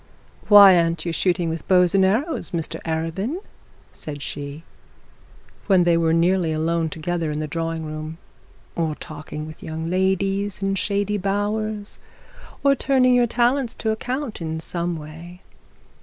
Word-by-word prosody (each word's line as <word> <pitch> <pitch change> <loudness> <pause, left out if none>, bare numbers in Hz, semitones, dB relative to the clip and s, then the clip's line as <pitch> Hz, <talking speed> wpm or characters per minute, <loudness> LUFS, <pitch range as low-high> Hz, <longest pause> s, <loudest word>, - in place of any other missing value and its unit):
'Why 200 -3 +9
aren't 165 -1 0
you 170 - -1
shooting 175 0 +1
with 165 0 -4
bows 180 -1 +4
and 195 -1 +4
arrows, 235 - 0
Mr 165 -2 -4
Arabin?' 165 - -2 0.5
said 145 -2 -8
she, 145 +2 -6 1.0
when 190 -3 +5
they 175 -1 +3
were 165 -1 +2
nearly 170 0 +2
alone 160 +1 0
together 165 +1 -3
in 150 - -3
the 155 - -2
sitting 165 +1 -3
room; 155 +1 -6 0.6
'or 160 -2 -1
talking 150 0 -8
with 155 -1 -11
young 160 +1 -5
ladies 195 +2 0
in 195 0 +1
shady 200 +1 0
bowers, 205 +2 -2 0.6
or 280 -1 +5
turning 260 -2 +3
your 245 -1 +4
talents 245 +1 +1
to 220 - -1
account 245 0 -4
in 160 -1 -3
some 170 +1 -2
way? 165 +4 -11
175 Hz, 145 wpm, -22 LUFS, 160-205 Hz, 1.0 s, Why